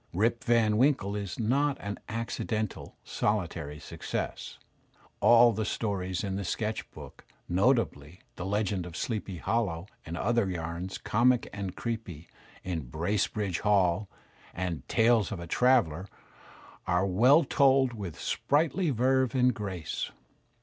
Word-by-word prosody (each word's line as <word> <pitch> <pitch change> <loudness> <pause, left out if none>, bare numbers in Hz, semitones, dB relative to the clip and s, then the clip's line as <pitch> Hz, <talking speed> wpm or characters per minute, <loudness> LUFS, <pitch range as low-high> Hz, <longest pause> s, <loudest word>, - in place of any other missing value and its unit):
*'Rip 115 +6 +1
Van 115 -3 +3
Winkle" 125 -6 +2
is 100 -3 -4
not 135 +5 +1
an 100 0 -5
accidental, 110 -2 -3
soUtary 85 -8 -2
success. - - -5 0.6
All 120 0 +7
the 110 +1 -2
stories 95 -4 -2
in 95 -1 -2
"The 100 - -3
Sketch 110 +4 -3
Book," - - -12 0.2
notably 90 - +1 0.2
"The - - -6
Legend 100 -3 -1
of 85 - -8
Sleepy 105 -5 -3
Hollow," 95 -4 -1 0.2
and 85 +1 -6
other 115 -1 +1
yams 85 +2 -4
comic 120 +2 +2
and 100 -3 -5
creepy 110 -9 -5 0.4
in 80 -8 -4
"Bracebridge 95 - -1
Hall," 100 -2 +2 0.5
and 90 -2 -3
"Tales 115 -3 +3
of 100 - -4
A 85 - -6
Traveller," 100 -5 +2 0.8
are 90 +2 +2
well 125 - +5
told, 135 -2 +3
with 95 -9 -7
sprightly 160 +4 +1
verve 130 0 +2
and 125 -1 +4
grace. 95 - -4
105 Hz, 130 wpm, -29 LUFS, 90-120 Hz, 0.8 s, All